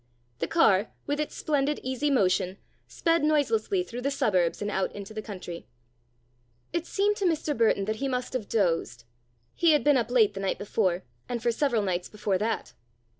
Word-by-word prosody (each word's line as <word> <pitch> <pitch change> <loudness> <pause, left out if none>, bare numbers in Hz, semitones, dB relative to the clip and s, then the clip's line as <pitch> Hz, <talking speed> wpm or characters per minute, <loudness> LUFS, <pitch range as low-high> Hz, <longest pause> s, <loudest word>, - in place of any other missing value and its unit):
The - - -1
car, 215 - +3 0.2
with 290 +1 -1
its 300 - -3
splendid 290 -1 0
easy 260 +3 -1
motion, 185 -6 +2 0.3
sped 330 -2 +1
noiselessly 360 +6 +2
through 245 -8 -7
the 275 - 0
suburbs 185 -11 +1
and 205 0 -2
out 190 -1 0
into 205 +1 -8
the 215 - -4
country. 185 -5 -8 1.1
It 340 0 -2
seemed 415 +1 +1
to 395 - -1
Mr. 315 -3 0
Burton 220 -3 +2
that 215 +1 -2
he 275 - -2
must 255 -1 -2
have 235 -6 -3
dozed. 165 - 0 0.5
He 335 -2 +4
had 295 -5 +3
been 290 0 +5
up 235 -2 0
late 225 -4 +4
the 195 - -6
night 195 -1 -1
before, 190 -3 0 0.3
and 245 -1 -2
for 240 - +3
several 235 -3 +1
nights 180 -2 -2
before 205 -3 -1
that. 225 +3 -2
235 Hz, 185 wpm, -27 LUFS, 200-290 Hz, 1.1 s, been